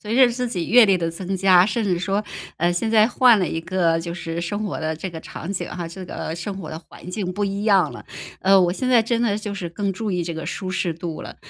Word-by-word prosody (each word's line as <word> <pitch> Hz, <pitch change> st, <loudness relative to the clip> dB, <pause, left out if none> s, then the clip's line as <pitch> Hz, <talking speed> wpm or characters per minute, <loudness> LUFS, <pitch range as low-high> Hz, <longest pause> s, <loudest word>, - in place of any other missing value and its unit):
随 215 Hz, +2 st, -4 dB
着 255 Hz, 0 st, +7 dB
自 250 Hz, +1 st, -2 dB
己 180 Hz, -7 st, -3 dB
阅 240 Hz, -1 st, +7 dB
历 195 Hz, -2 st, +4 dB
的 165 Hz, -1 st, -2 dB
增 185 Hz, +3 st, -4 dB
加， 185 Hz, -1 st, +5 dB
甚 230 Hz, +2 st, -1 dB
至 185 Hz, -4 st, 0 dB
说， 195 Hz, +3 st, -1 dB, 0.3 s
呃， 175 Hz, +2 st, +1 dB
现 175 Hz, +6 st, -1 dB
在 220 Hz, 0 st, +5 dB
换 245 Hz, -2 st, +5 dB
了 180 Hz, -, 0 dB
一 165 Hz, -, -3 dB
个， 170 Hz, -2 st, +1 dB
就 170 Hz, +1 st, -5 dB
是 165 Hz, -1 st, -4 dB
生 205 Hz, +5 st, -3 dB
活 205 Hz, -, -3 dB
的 160 Hz, 0 st, -2 dB
这 180 Hz, +4 st, -6 dB
个 165 Hz, -1 st, -7 dB
场 170 Hz, +3 st, -7 dB
景 190 Hz, -, -4 dB
哈， 175 Hz, -2 st, -5 dB
这 185 Hz, +3 st, -8 dB
个 160 Hz, -, -5 dB
生 190 Hz, +3 st, -5 dB
活 195 Hz, -, -7 dB
的 160 Hz, -, -6 dB
环 180 Hz, -, -12 dB
境 185 Hz, -1 st, -3 dB
不 205 Hz, +3 st, -1 dB
一 200 Hz, +1 st, -3 dB
样 200 Hz, -4 st, +4 dB
了， -, -, -10 dB, 0.4 s
呃， 195 Hz, 0 st, +5 dB
我 175 Hz, -1 st, +2 dB
现 255 Hz, +7 st, -2 dB
在 240 Hz, -3 st, +5 dB
真 230 Hz, +1 st, 0 dB
的 225 Hz, -4 st, +1 dB
就 210 Hz, -1 st, -5 dB
是 185 Hz, -4 st, -4 dB
更 195 Hz, +4 st, -2 dB
注 205 Hz, +1 st, -3 dB
意 180 Hz, -, 0 dB
这 170 Hz, 0 st, -4 dB
个 160 Hz, -, -6 dB
舒 185 Hz, -2 st, -4 dB
适 180 Hz, -3 st, -1 dB
度 165 Hz, -1 st, -6 dB
了。 -, -, -9 dB
190 Hz, 295 characters per minute, -22 LUFS, 170-210 Hz, 0.4 s, 着